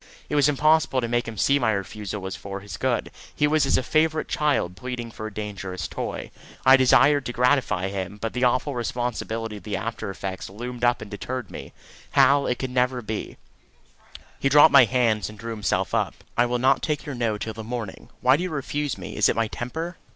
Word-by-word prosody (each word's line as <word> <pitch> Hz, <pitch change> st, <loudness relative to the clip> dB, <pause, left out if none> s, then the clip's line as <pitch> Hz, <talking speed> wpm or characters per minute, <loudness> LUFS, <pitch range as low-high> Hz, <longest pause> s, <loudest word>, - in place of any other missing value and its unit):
It -, -, -1 dB
was 145 Hz, -1 st, +4 dB
impossible 155 Hz, -1 st, +3 dB
to 120 Hz, -, -1 dB
make 120 Hz, +1 st, 0 dB
him 115 Hz, -1 st, -6 dB
see 140 Hz, +7 st, +3 dB
my 115 Hz, -4 st, +2 dB
refusal 100 Hz, 0 st, -5 dB
was 95 Hz, 0 st, -4 dB
for 100 Hz, 0 st, -7 dB
his 100 Hz, -3 st, -8 dB
good. -, -, -1 dB, 0.2 s
He 150 Hz, -, +2 dB
was 150 Hz, -1 st, +2 dB
as -, -, +3 dB
a -, -, -1 dB
favourite 155 Hz, +3 st, +1 dB
child 145 Hz, -, 0 dB
pleading 120 Hz, +1 st, -6 dB
for 110 Hz, 0 st, -6 dB
a -, -, -8 dB
dangerous 100 Hz, -4 st, -5 dB
toy. -, -, -5 dB, 0.3 s
I 130 Hz, 0 st, +9 dB
desired 135 Hz, +2 st, +5 dB
to -, -, -2 dB
gratify 125 Hz, -7 st, +2 dB
him, 95 Hz, +1 st, -5 dB
but 115 Hz, +1 st, -3 dB
the 125 Hz, -, -1 dB
awful 130 Hz, +3 st, +2 dB
responsibility 115 Hz, -2 st, -3 dB
of -, -, -13 dB
the 105 Hz, -2 st, -3 dB
after 110 Hz, +2 st, -4 dB
effects 95 Hz, -1 st, -5 dB
loomed 120 Hz, +4 st, -7 dB
up 120 Hz, -1 st, +2 dB
and 105 Hz, -, -12 dB
deterred 125 Hz, +5 st, -5 dB
me. -, -, -8 dB, 0.4 s
"Hal, 140 Hz, 0 st, +5 dB
it 125 Hz, -, 0 dB
can 130 Hz, -1 st, -4 dB
never 125 Hz, -1 st, +1 dB
be." 110 Hz, 0 st, -5 dB, 1.0 s
He 135 Hz, -, +2 dB
dropped 145 Hz, +1 st, +7 dB
my 135 Hz, -3 st, +8 dB
hands 115 Hz, -3 st, +1 dB
and 105 Hz, -, -11 dB
drew 115 Hz, +2 st, -6 dB
himself 105 Hz, -3 st, -1 dB
up. -, -, 0 dB, 0.2 s
"I 120 Hz, +1 st, +3 dB
will 125 Hz, 0 st, 0 dB
not 130 Hz, +2 st, +3 dB
take 150 Hz, -2 st, -2 dB
your 145 Hz, -, -5 dB
No 115 Hz, -4 st, -1 dB
till 110 Hz, +1 st, -5 dB
the 110 Hz, +1 st, -7 dB
morning. 115 Hz, -3 st, -6 dB
Why 130 Hz, +2 st, +5 dB
do -, -, -4 dB
you 185 Hz, -, -2 dB
refuse 145 Hz, -2 st, -3 dB
me? -, -, -8 dB
Is -, -, +4 dB
it -, -, +1 dB
my 115 Hz, -1 st, +1 dB
temper? 160 Hz, +8 st, -5 dB
120 Hz, 215 wpm, -24 LUFS, 105-135 Hz, 1.0 s, I